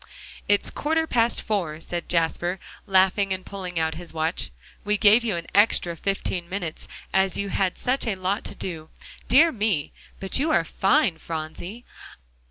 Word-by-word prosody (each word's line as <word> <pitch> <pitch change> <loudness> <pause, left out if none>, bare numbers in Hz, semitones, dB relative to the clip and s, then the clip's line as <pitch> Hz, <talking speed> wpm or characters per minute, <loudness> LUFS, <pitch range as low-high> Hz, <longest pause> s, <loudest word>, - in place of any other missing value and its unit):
"It's 205 0 +2
quarter 320 +2 0
past 235 -5 +1
four," 175 -8 -2
said 170 +1 -5
Jasper, 175 +2 +1 0.3
laughing 190 +1 +3
and 185 -1 -3
pulling 185 -3 -6
out 160 0 0
his 165 +1 -7
watch; 160 +1 -1 0.3
"we 210 0 +1
gave 215 +4 +6
you 220 -6 -1
an 170 0 -5
extra 200 -5 +4
fifteen 180 -1 -2
minutes, 180 -5 -5 0.3
as 190 -1 +2
you 200 0 -2
had 190 -2 0
such 255 0 0
a 215 - 0
lot 190 +2 -2
to - - -3
do. 160 -3 -5 0.4
Dear 315 +7 +6
me! 205 - -1 0.3
but 195 +6 -1
you 305 +4 +1
are 240 - +3
fine, 195 - +2
Phronsie. 170 +9 -6
190 Hz, 165 wpm, -24 LUFS, 170-210 Hz, 0.4 s, gave